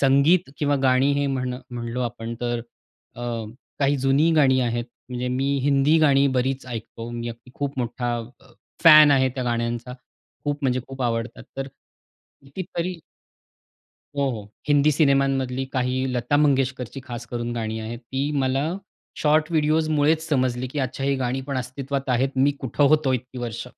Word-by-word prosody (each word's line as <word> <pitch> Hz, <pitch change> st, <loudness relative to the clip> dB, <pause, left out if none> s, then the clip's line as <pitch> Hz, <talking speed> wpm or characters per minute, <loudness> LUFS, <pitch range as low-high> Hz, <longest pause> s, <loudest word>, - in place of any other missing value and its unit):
संगीत 140 Hz, +5 st, +4 dB
किंवा 145 Hz, -1 st, +2 dB
गाणी 130 Hz, +1 st, +4 dB
हे 145 Hz, 0 st, +1 dB
म्हण 130 Hz, -2 st, -2 dB, 0.2 s
म्हणलो 120 Hz, 0 st, -4 dB
आपण 115 Hz, -1 st, -4 dB
तर 120 Hz, 0 st, 0 dB, 0.6 s
अ, 120 Hz, -, -7 dB, 0.6 s
काही 140 Hz, +1 st, +3 dB
जुनी 135 Hz, +5 st, +3 dB
गाणी 130 Hz, -4 st, +4 dB
आहेत. 120 Hz, -1 st, -1 dB, 0.2 s
म्हणजे 125 Hz, 0 st, -3 dB
मी 130 Hz, +2 st, 0 dB
हिंदी 140 Hz, +2 st, +4 dB
गाणी 140 Hz, -2 st, +4 dB
बरीच 130 Hz, +1 st, -1 dB
ऐकतो. 115 Hz, -1 st, -7 dB
मी 120 Hz, 0 st, -4 dB
अगदी 120 Hz, +2 st, -10 dB
खूप 140 Hz, -1 st, -4 dB
मोठा 120 Hz, 0 st, -2 dB, 0.2 s
अ, -, -, -20 dB, 0.4 s
फॅन 155 Hz, -2 st, +10 dB
आहे 130 Hz, -1 st, +4 dB
त्या 130 Hz, -2 st, -3 dB
गाण्यांचा. 120 Hz, +1 st, -2 dB, 0.5 s
खूप 145 Hz, 0 st, -1 dB
म्हणजे 130 Hz, -1 st, +1 dB
खूप 135 Hz, -1 st, -6 dB
आवडतात 115 Hz, 0 st, -2 dB
तर 135 Hz, 0 st, -3 dB, 0.8 s
कितीतरी 175 Hz, +3 st, -4 dB, 1.2 s
हो, 140 Hz, -1 st, +1 dB
हो. 105 Hz, -3 st, -7 dB, 0.2 s
हिंदी 145 Hz, +1 st, +4 dB
सिनेमांमधली 135 Hz, -3 st, +2 dB
काही 130 Hz, 0 st, 0 dB
लता 125 Hz, +4 st, +1 dB
मंगेशकरची 135 Hz, -3 st, +1 dB
खास 120 Hz, -2 st, -7 dB
करून 120 Hz, -1 st, -4 dB
गाणी 110 Hz, -1 st, -3 dB
आहेत. 115 Hz, +2 st, -5 dB
ती 135 Hz, +4 st, -3 dB
मला 135 Hz, +4 st, 0 dB, 0.5 s
शॉर्ट 155 Hz, +1 st, +3 dB
व्हिडिओस 155 Hz, 0 st, +2 dB
मुळेच 155 Hz, +2 st, +2 dB
समजली, 130 Hz, -3 st, 0 dB
की 145 Hz, +4 st, -6 dB
आज 130 Hz, -, +1 dB
अच्छा 135 Hz, +1 st, -6 dB
ही 140 Hz, 0 st, +2 dB
गाणी 130 Hz, 0 st, -1 dB
पण 140 Hz, -2 st, -2 dB
अस्तित्वात 135 Hz, +2 st, -4 dB
आहेत. 125 Hz, +2 st, +2 dB
मी 135 Hz, +2 st, +4 dB
कुठे 135 Hz, +2 st, -1 dB
होतो 155 Hz, -3 st, +3 dB
इतकी 125 Hz, 0 st, -4 dB
वर्ष? 120 Hz, 0 st, -5 dB
130 Hz, 160 wpm, -24 LUFS, 120-140 Hz, 1.2 s, फॅन